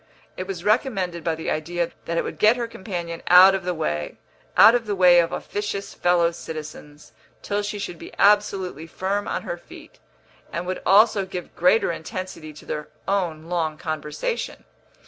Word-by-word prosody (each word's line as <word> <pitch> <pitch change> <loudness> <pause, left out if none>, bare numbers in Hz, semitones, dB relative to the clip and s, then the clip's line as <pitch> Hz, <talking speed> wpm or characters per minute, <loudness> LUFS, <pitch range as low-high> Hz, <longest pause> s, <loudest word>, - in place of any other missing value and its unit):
It 185 - -5
was 185 -3 -5
recommended 195 - 0
by 165 -1 0
the 160 - -4
idea 170 +2 -2
that 170 - -2
it - - +1
would - - -7
get 215 +3 +5
her 235 -1 -2
companion 175 -6 -6
out 185 +2 +8
of 190 -1 -2
the 180 - 0
way 75 - -3 0.4
out 225 - +9
of 240 -2 0
the 205 - -1
way 180 -2 +6
of 170 0 +1
officious 205 -1 -4
fellow 175 -1 +2
citizens 155 -2 -9 0.3
till 205 0 -1
she 205 0 -4
should 175 -4 -6
be - - -10
absolutely 195 -5 +2
firm 195 +5 -2
on - - -3
her - - -4
feet, - - -15 0.5
and 170 - -4
would 185 +1 -4
also 205 +1 +5
give 180 -1 -7
greater 180 +3 +3
intensity 165 -1 -6
to 150 - -14
their 150 0 -5 0.2
own 180 -6 -1
long 165 -2 -2
conversation. 155 - -4
180 Hz, 175 wpm, -23 LUFS, 165-200 Hz, 0.5 s, out